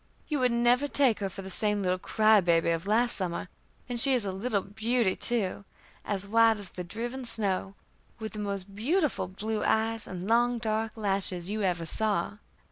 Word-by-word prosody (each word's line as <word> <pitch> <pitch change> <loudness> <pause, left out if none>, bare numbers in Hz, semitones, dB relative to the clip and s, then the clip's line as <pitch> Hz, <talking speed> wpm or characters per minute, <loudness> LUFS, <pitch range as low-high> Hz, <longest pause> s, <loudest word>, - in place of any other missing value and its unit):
You 300 -3 -1
would 250 -1 +3
never 240 +4 +3
take 270 -6 +3
her 195 -2 -2
for 195 +1 -8
the 190 - -6
same 210 0 +1
little 185 0 0
cry 215 +1 +4
baby 170 -1 +2
of 165 +3 -2
last 235 +3 +2
summer, 180 -1 -3 0.4
and 245 -1 -3
she 270 0 +5
is 235 -5 -1
a 195 - -2
little 200 +1 -1
beauty 225 0 0
too 210 -5 -1 0.4
as 200 -1 -2
white 225 +1 +4
as 200 -3 +1
the 180 - -6
driven 235 +8 -5
snow, 200 -4 -1 0.4
with 220 -1 -6
the 215 - -6
most 200 -1 -4
beautiful 300 - 0
blue 210 +4 -3
eyes, 225 0 0
and 185 0 -6
long, 240 +2 +3
dark 220 0 -2
lashes 195 -3 -1
you 215 0 -2
ever 175 -4 0
saw. 205 +2 -1
215 Hz, 190 wpm, -28 LUFS, 190-235 Hz, 0.4 s, she